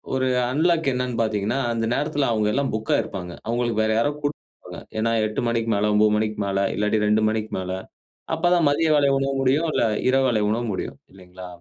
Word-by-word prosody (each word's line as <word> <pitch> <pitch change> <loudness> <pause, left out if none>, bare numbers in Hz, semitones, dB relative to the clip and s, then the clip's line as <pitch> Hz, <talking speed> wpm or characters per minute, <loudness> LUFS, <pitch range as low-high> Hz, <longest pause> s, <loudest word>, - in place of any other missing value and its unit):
ஒரு 130 0 +1 0.2
அன்லாக் 160 0 +2
என்னன்னு 125 -2 -2
பார்த்தீங்கன்னா, 110 +3 -1
அந்த 115 0 -1
நேரத்துல 145 -2 0
அவங்க 105 -1 +1
எல்லாம் 140 0 0
புக்‌கா 110 0 0
இருப்பாங்க. 90 -5 -7
அவங்களுக்கு 120 -2 0
வேற 110 - +1
யாரோ 145 +5 +1
கூட்டப் 145 +1 -1 0.6
ஏன்னா 115 +1 +1
8 105 +3 -2
மணிக்கு 115 -1 -1
மேல, 105 +1 +1
9 105 0 +4
மணிக்கு 110 -1 -2
மேல, 100 0 -1 0.2
இல்லாட்டி 105 +1 +1
2 105 +1 +3
மணிக்கு 110 0 -3
மேல. 95 0 -4 0.6
அப்பதான் 175 -1 +2
மதிய 160 +3 +1
வேலை 140 -1 +3
உணவ 135 0 -1
முடியும், 145 +5 +2
இல்ல - - +1 0.3
இரவு 135 0 +3
வேலை 110 -3 +1
உணவ 115 +2 0
முடியும். - - -5 0.2
இல்லைங்களா? 90 -1 -11
115 Hz, 185 wpm, -23 LUFS, 105-135 Hz, 0.6 s, 9